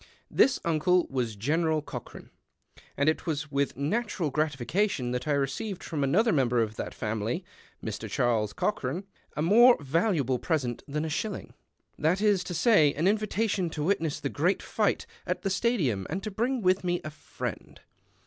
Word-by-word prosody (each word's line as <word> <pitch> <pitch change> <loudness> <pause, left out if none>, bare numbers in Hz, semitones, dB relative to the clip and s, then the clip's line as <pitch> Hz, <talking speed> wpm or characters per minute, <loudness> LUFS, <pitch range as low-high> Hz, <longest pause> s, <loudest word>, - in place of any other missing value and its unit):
This 270 - +4
uncle 170 +2 +3
was 120 -5 -1
General 155 +7 +1
Cochran; - - -9 0.7
and 140 - +1
it 155 - +1
was 145 -2 -2
with 140 -3 0
natural 175 - -1
gratification 150 - 0
that 125 +4 -3
I 150 - +2
received 145 - -2
from 150 -4 -2
another 210 - +3
member 125 -6 +2
of 110 -1 0
that - - -5
family, 110 - -2 0.4
Mr. 110 0 -4
Charles 115 -2 +1
Cochran, 180 -3 -2 0.3
a 150 - +1
more 240 +8 +7
valuable 145 - +1
present 135 -8 -1
than 150 +2 -2
a - - -3
shilling, 200 +6 -4 0.5
that 165 +5 +2
is 205 -3 +3
to 175 - -4
say, 160 -5 +4
an 160 +5 +1
invitation 210 -3 +1
to 150 -2 -4
witness 160 -4 0
the - - -2
Great 175 +7 0
Fight - - 0 0.2
at - - -2
the 195 - 0
Stadium 175 - 0
and 190 +5 -3
to 215 - -4
bring 235 +4 -1
with 185 +1 +3
me 175 -1 0
a 155 - -4
friepd. 145 - -7
160 Hz, 170 wpm, -28 LUFS, 135-195 Hz, 0.7 s, more